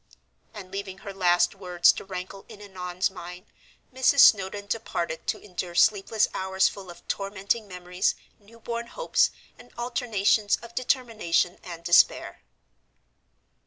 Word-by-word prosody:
And 195 -4 -10
leaving 195 -1 -6
her 200 - -6
last 175 -2 +2
words 180 -3 +3
to - - -8
rankle 190 +1 -7
in 215 -3 -12
Annon's 185 -2 -3
mind, 180 0 -10 0.5
Mrs. 260 +2 +4
Snowdon 200 0 +4
departed 175 -6 -4
to - - -1
endure 180 -3 -6
sleepless 210 +3 +3
hours 190 0 +1
full 195 -3 -8
of 175 - -13
tormenting 200 +2 -2
memories, 180 -1 -2 0.2
newborn 230 +2 -7
hopes, - - +1 0.3
and 245 - -16
alternations 225 -4 +1
of 235 0 -11
determination 230 -9 0
and 170 -2 -9
despair. 175 0 +3
195 Hz, 125 wpm, -26 LUFS, 180-220 Hz, 0.5 s, Mrs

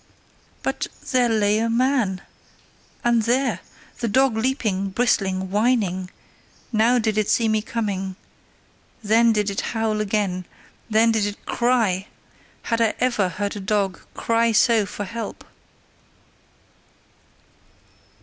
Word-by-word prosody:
BUT - - -2 0.2
THERE 250 -3 +3
LAY 210 -1 +2
A 230 +1 0
MAN! 235 -6 +1 0.8
And 240 -1 +3
there! 250 +4 +1 0.4
The 235 - -1
dog 260 +2 +3
leaping, 220 -5 -1
bristling, 190 -4 0
whining 205 -4 +1 0.6
now 230 +2 +3
did 220 -2 +1
it 215 - 0
see 230 - +3
me 215 -1 +1
coming 200 -4 -3 0.9
then 225 +2 +4
did 210 -2 0
it 195 - -2
howl 220 -2 -1
again, 195 -3 -1 0.4
then 225 +1 +4
did 215 -2 +1
it 205 - -8
CRY: 225 -6 +1 0.6
had 230 -1 0
I 225 -2 +2
ever 235 -7 +1
heard 200 +3 -3
a - - -5
dog 200 -1 -1 0.2
cry 230 0 +1
so 220 -1 +3
for 205 - -5
help? 230 +4 -6
220 Hz, 120 wpm, -22 LUFS, 200-235 Hz, 0.9 s, then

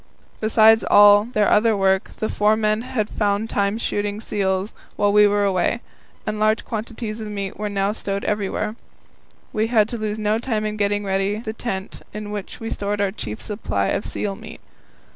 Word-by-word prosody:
Besides 220 0 +5
all 205 0 +7
their 215 -3 +1
other 215 0 +3
work, 190 -1 +2
the 215 - -1
four 210 +1 +2
men 215 0 +1
had 235 -4 -2
found 210 +1 -1
time 200 0 +1
for 230 - -5
shooting 205 0 -2
seals 195 -2 -1 0.2
while 205 0 +2
we 210 0 +7
were 205 0 +1
away, 190 +2 +1 0.5
and 215 -1 -3
large 215 +1 +2
quantities 225 0 -5
of 215 - -5
meat 200 -2 -4
were 210 0 -2
now 200 0 0
stowed 200 -2 -4
everywhere. 210 +1 -1 0.8
We 220 +1 +1
had 220 -3 +3
to 235 - -5
lose 215 0 -2
no 215 +1 0
time 225 -3 -2
in 215 0 -2
getting 205 0 0
ready 195 +1 0
the 220 0 -5
tent 195 -4 -5
in 210 -1 -5
which 205 -2 -6
we 225 0 -5
stored 205 0 -2
our 200 -1 +1
chief 110 - -6
supply 100 - -2
of - - -1
seal 200 -2 -3
meat. - - -11
210 Hz, 190 wpm, -22 LUFS, 200-215 Hz, 0.8 s, all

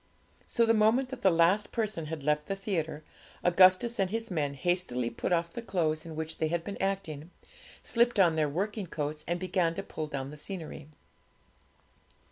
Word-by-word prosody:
So, 235 - +2
the 225 - +4
moment 225 +4 +3
that 265 - -7
the 195 - +5
last 175 +5 +3
person 215 -9 -2
had 155 -2 -5
left 150 +1 +1
the 195 - -1
theatre, 165 -6 -3 0.4
Augustus 185 +6 +5
and 190 -1 +2
his 225 +1 -3
men 145 -5 -1
hastily 135 -6 0
put 115 - -3
off 170 -1 +1
the 235 - -5
clothes 165 -7 -1
in 160 - -7
which 160 0 -5
they 160 - +2
had 170 +1 -1
been 200 +3 -6
acting, 180 -6 -2 0.5
slipped 235 -2 +2
on 170 -4 +5
their 155 -2 +1
working 200 +5 -2
coats, 150 -1 -4
and 175 +1 -1
began 180 -2 0
to 195 - -4
pull 155 -5 -5
down 140 -2 -5
the 150 - -9
scenery. 160 -3 -6
175 Hz, 185 wpm, -30 LUFS, 155-200 Hz, 0.5 s, the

